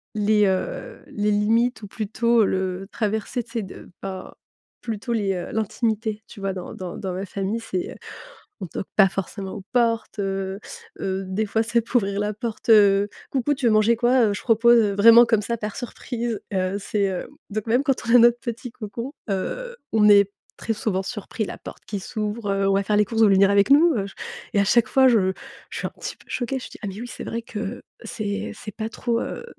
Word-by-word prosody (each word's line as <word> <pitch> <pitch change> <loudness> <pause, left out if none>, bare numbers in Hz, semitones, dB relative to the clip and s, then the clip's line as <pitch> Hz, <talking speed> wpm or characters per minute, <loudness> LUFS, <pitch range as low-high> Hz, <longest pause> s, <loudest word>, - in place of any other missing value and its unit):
les, 210 0 +3
heu, 190 -1 -2
les 210 0 -1
limites 225 +3 +2
ou - - -6
plutôt 225 +3 +1
le 190 0 -2
traverser 220 +2 -2
tu 230 - -20
sais 230 -1 -2
de, 190 - -11
ben, 190 -1 -6 0.5
plutôt 230 +1 -3
les, 205 -4 0
heu, 180 -2 -4
l'intimité. 220 0 -1
Tu 215 - -12
vois? 195 -1 -2
Dans 185 -1 -7
dans 180 -2 -6
dans 190 -2 -4
ma 190 +2 -4
famille, 200 +3 -3
c'est, 190 -5 -4
heu, - - -10 0.7
on - - -3
toque 185 - -6
pas 195 -3 +6
forcément 195 +1 -5
aux 200 - -7
portes, 230 -3 +1
heu, 195 0 -2 0.4
heu, 190 0 -2
des 195 +4 -1
fois, 220 +2 +1
ça 235 +1 +2
peut 230 - -16
ouvrir 200 -3 0
la 210 +1 -1
porte, 230 +1 -5
heu: 205 -2 +6 0.2
«Coucou, 275 +2 +1
tu 275 -2 -3
veux - - +4
manger 215 +2 +4
quoi? 240 0 +4
Heu, 205 - 0
je 205 - -5
propose», 235 +1 +5
heu, 210 -3 +2
vraiment 230 +4 +8
comme 225 -2 +2
ça 235 +2 -2
par 210 -1 -5
surprise, 240 -2 -4
heu, 185 +1 0
c'est 205 0 -1
hem 190 -2 -2 0.2
donc 215 +1 -4
même 245 +4 +3
quand 275 -3 +2
on 235 - +6
a - - +11
notre 240 0 +6
petit 235 0 -5
cocon, 230 +4 -6 0.2
heu, 485 - -3 0.2
on 215 -1 +5
est 200 -1 +6 0.3
très 225 - -2
souvent 195 -3 -1
surpris 215 +1 -4
la - - -7
porte - - -11
qui 205 - -4
s'ouvre, 215 -1 -3
heu,: 195 0 +1
«On - - +3
va 195 0 +2
faire 210 +1 +1
les 210 - +4
courses 225 +2 -1
vous 215 - +7
voulez 195 0 +6
avec 200 +2 +3
nous?» 315 +4 +6
Heu 195 - -1 0.5
et 205 - +3
à - - +4
chaque 230 +2 +4
fois, 265 -1 +5
je 210 -7 +4 0.4
je - - -6
suis - - -2
un - - -9
petit - - -6
peu - - -21
choquée, 260 +2 -2
je - - -9
dis: - - -12
«Ah - - -2
mais 195 +1 -6
oui, 245 - -6
c'est - - -8
vrai 230 - -3
que 220 0 -5 0.2
c'est 205 -2 -4
c'est 210 -2 -9
pas 220 0 -3
trop, 235 0 -1
heu, - - -5
215 Hz, 225 wpm, -23 LUFS, 195-235 Hz, 0.7 s, a